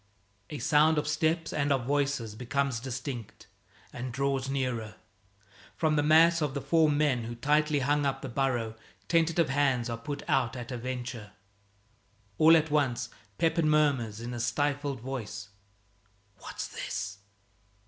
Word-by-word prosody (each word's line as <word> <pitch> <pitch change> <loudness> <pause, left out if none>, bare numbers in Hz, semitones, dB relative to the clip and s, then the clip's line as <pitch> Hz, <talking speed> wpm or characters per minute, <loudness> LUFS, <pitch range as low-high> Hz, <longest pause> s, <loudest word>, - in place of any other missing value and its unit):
A 150 - -5
sound 155 +2 +4
of 150 - 0
steps 160 +2 0
and 145 -1 0
of 135 -4 +1
voices 140 -5 0
becomes 125 +2 -1
distinct 130 -2 -6 0.5
and 125 +1 -5
draws 135 +1 -1
nearer. 125 -5 -2 0.8
From 155 -2 +1
the 145 - +3
mass 165 +2 +5
of 145 -2 -1
the 140 - -2
four 160 0 +3
men 145 -5 +1
who 120 +1 -5
tightly 150 +3 +2
hung 145 +2 +1
up 140 -1 -1
the - - -3
burrow, 125 -3 -1 0.3
tentative 165 -2 +2
hands 130 -4 +1
are 115 - -4
put 145 +4 -5
out 125 -1 +1
at 125 0 -7
a 125 - -3
venture. 125 -3 -5 1.1
All 160 +1 +8
at 160 -1 -1
once 140 -5 +1 0.3
Pepin 165 -1 +2
murmurs 135 -8 +2
in 120 +1 -5
a 120 - -4
stifled 145 +1 -1
voice, 110 -6 -6 0.9
"What's - - -6
this?" 100 0 -5
135 Hz, 150 wpm, -29 LUFS, 120-150 Hz, 1.1 s, All